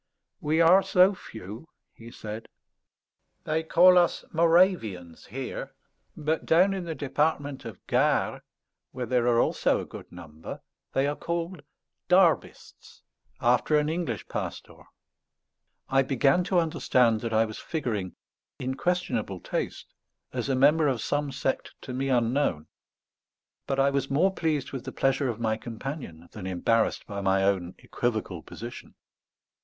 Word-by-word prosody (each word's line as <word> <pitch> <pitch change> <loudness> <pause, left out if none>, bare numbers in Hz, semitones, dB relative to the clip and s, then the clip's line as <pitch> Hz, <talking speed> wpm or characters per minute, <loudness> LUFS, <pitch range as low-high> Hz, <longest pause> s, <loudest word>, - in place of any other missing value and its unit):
"We 155 +2 +1
are 175 +4 +7
so 185 +1 +4
few," 110 - -10 0.2
he 115 0 -12
said. 110 -1 -8 1.0
"They 155 +1 0
call 180 +3 +6
us 175 - +1
Moravians 165 - +2
here; 130 +4 -6 0.4
but 155 +1 -1
down 185 +4 +4
in 190 -2 -4
the 165 -1 -4
Department 145 -1 -1
of 110 -5 -9
Gard, - - +1 0.5
where 125 - -3
there 125 -1 +1
are 120 -1 +4
also - - +2
a - - -5
good - - -11
number, 80 -3 -9 0.3
they 135 - +2
are 145 +1 -1
called 170 +1 -4 0.5
Derbists, 180 -2 +1 0.4
after 125 +5 +3
an 150 0 +1
English 160 - -3
pastor." - - -6 1.0
I 135 0 +3
began 135 +5 +2
to 190 -1 +1
understand 125 -9 +2
that 115 - -3
I 110 0 +3
was 110 -1 -7
figuring, 110 - -3 0.4
in 130 +1 -3
questionable 130 - -1
taste, - - -4 0.4
as - - -3
a 135 - +2
member 150 +4 +4
of 130 -4 0
some 145 +5 -1
sect 130 0 -2
to 130 - -7
me 135 +2 -2
unknown; 120 - +1 1.0
but 135 -1 -1
I 140 +1 +4
was 140 0 -1
more 175 +8 +2
pleased 155 -6 -1
with 135 -3 -5
the - - -5
pleasure 135 0 +1
of 115 -2 -4
my 110 -1 0
companion 115 - -7
than 100 -3 -7
embarrassed 110 +5 +1
by 100 -1 -5
my 95 0 +2
own 95 -2 0
equivocal 110 -8 -3
position. 120 +8 -9
135 Hz, 145 wpm, -27 LUFS, 110-160 Hz, 1.0 s, are